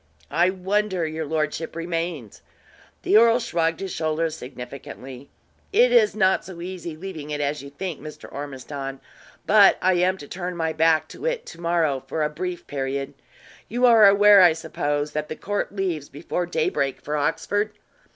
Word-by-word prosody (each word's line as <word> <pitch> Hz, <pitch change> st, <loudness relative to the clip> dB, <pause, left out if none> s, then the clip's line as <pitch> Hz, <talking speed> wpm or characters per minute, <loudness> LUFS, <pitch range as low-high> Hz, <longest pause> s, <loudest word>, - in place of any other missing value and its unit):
"I 175 Hz, +2 st, +3 dB
wonder 190 Hz, -1 st, -1 dB
your 155 Hz, 0 st, -4 dB
lordship 155 Hz, +1 st, -2 dB
remains?" 165 Hz, -, -4 dB, 0.6 s
The -, -, +5 dB
earl 230 Hz, +1 st, +6 dB
shrugged 165 Hz, -8 st, -1 dB
his 195 Hz, -1 st, -4 dB
shoulders 160 Hz, 0 st, -1 dB
significantly. 130 Hz, 0 st, -9 dB, 0.4 s
"It 480 Hz, +5 st, +5 dB
is 470 Hz, -4 st, +4 dB
not 190 Hz, -3 st, +3 dB
so 185 Hz, -3 st, -10 dB
easy 175 Hz, -2 st, -6 dB
leaving 160 Hz, -4 st, -7 dB
it 150 Hz, -1 st, -3 dB
as 145 Hz, 0 st, -1 dB
you 140 Hz, -, -9 dB
think, 165 Hz, +2 st, -6 dB
Mr. 155 Hz, +1 st, -9 dB
Ormiston; 135 Hz, -1 st, -6 dB, 0.5 s
but 205 Hz, -1 st, +6 dB
I 185 Hz, +1 st, +3 dB
am 180 Hz, +2 st, +2 dB
to 145 Hz, -, -10 dB
turn 180 Hz, +1 st, -5 dB
my 160 Hz, -1 st, -1 dB
back 160 Hz, 0 st, +3 dB
to 485 Hz, -, -5 dB
it -, -, -2 dB
to 170 Hz, -, -11 dB
morrow 165 Hz, -6 st, +1 dB
for 155 Hz, +3 st, -1 dB
a 150 Hz, -, -1 dB
brief 180 Hz, +3 st, -5 dB
period. 135 Hz, 0 st, -3 dB, 0.6 s
You 245 Hz, +3 st, +2 dB
are 225 Hz, -4 st, +8 dB
aware, 200 Hz, 0 st, +7 dB
I 175 Hz, -3 st, +7 dB
suppose, 145 Hz, -2 st, -2 dB
that 150 Hz, +1 st, -3 dB
the 155 Hz, -, -4 dB
court 205 Hz, +3 st, -3 dB
leaves 175 Hz, -7 st, -2 dB
before 175 Hz, +4 st, -3 dB
daybreak 155 Hz, -5 st, -1 dB
for 150 Hz, -, -3 dB
Oxford." 205 Hz, +8 st, 0 dB
165 Hz, 170 wpm, -24 LUFS, 150-190 Hz, 0.6 s, are